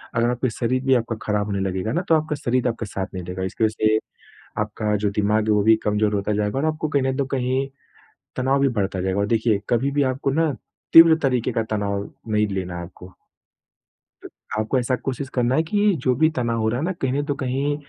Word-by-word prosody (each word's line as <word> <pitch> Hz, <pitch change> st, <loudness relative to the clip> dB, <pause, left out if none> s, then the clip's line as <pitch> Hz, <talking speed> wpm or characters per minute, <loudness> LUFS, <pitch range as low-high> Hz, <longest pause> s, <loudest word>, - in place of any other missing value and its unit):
अगर 115 Hz, +1 st, +2 dB
आपके 125 Hz, +1 st, 0 dB
शरीर 125 Hz, +3 st, -1 dB
भी 135 Hz, -, +4 dB
आपका 115 Hz, -1 st, -1 dB
ख़राब 105 Hz, -1 st, 0 dB
होने 100 Hz, -1 st, -2 dB
लगेगा 95 Hz, +4 st, -2 dB
ना 170 Hz, -, +1 dB
तो 160 Hz, -, +6 dB
आपका 155 Hz, -1 st, 0 dB
शरीर 125 Hz, -2 st, 0 dB
आपका 115 Hz, -1 st, -2 dB
साथ 95 Hz, -1 st, -4 dB
नहीं 90 Hz, -1 st, -5 dB
देगा। 90 Hz, +1 st, -5 dB
इसकी 95 Hz, +4 st, -2 dB
वज़ह 110 Hz, 0 st, 0 dB
से, 110 Hz, 0 st, +4 dB, 0.6 s
आपका 105 Hz, 0 st, -1 dB
जो 105 Hz, 0 st, 0 dB
दिमाग 105 Hz, +1 st, +1 dB
है, -, -, +4 dB
वो 105 Hz, -, +3 dB
भी 110 Hz, +1 st, +5 dB
कमज़ोर 105 Hz, 0 st, +1 dB
होता 100 Hz, +1 st, -1 dB
जाएगा 105 Hz, +4 st, -1 dB
और 140 Hz, -, -1 dB
आपको 155 Hz, 0 st, -3 dB
कहीं 145 Hz, -2 st, +1 dB
ना 130 Hz, 0 st, 0 dB
तो 140 Hz, -, +2 dB
कहीं 130 Hz, +2 st, 0 dB, 0.7 s
तनाव 135 Hz, +2 st, +1 dB
भी 140 Hz, -, +4 dB
बढ़ता 95 Hz, -2 st, -1 dB
जाएगा 95 Hz, +2 st, -1 dB
और 100 Hz, -, +2 dB
देखिए, 110 Hz, -2 st, +1 dB
कभी 130 Hz, +4 st, +1 dB
भी 145 Hz, 0 st, +2 dB
आपको 135 Hz, +1 st, -2 dB
ना 160 Hz, +1 st, +1 dB, 0.4 s
तीव्र 165 Hz, 0 st, +9 dB
तरीके 125 Hz, -3 st, +1 dB
का 115 Hz, -, 0 dB
तनाव 100 Hz, -1 st, -2 dB, 0.2 s
नहीं 105 Hz, 0 st, +2 dB
लेना 95 Hz, -3 st, -4 dB
है 85 Hz, -, -5 dB
आपको। 90 Hz, +1 st, -13 dB, 1.1 s
त -, -, -8 dB, 0.3 s
आपको 110 Hz, +5 st, 0 dB
ऐसा 125 Hz, +1 st, 0 dB
कोशिश 135 Hz, 0 st, -3 dB
करना 125 Hz, 0 st, +1 dB
है 160 Hz, -, +3 dB
कि 205 Hz, +4 st, +2 dB
जो 130 Hz, -, +3 dB
भी 155 Hz, +5 st, +3 dB
तनाव 115 Hz, -2 st, 0 dB
हो 110 Hz, -, +1 dB
रहा 120 Hz, +3 st, -1 dB
है 160 Hz, -, -1 dB
ना, 185 Hz, -, -1 dB
कहीं 135 Hz, -7 st, -2 dB
ना 145 Hz, -, +1 dB
तो 145 Hz, -, +1 dB
कहीं 140 Hz, +1 st, -1 dB
115 Hz, 235 wpm, -22 LUFS, 105-135 Hz, 1.1 s, तीव्र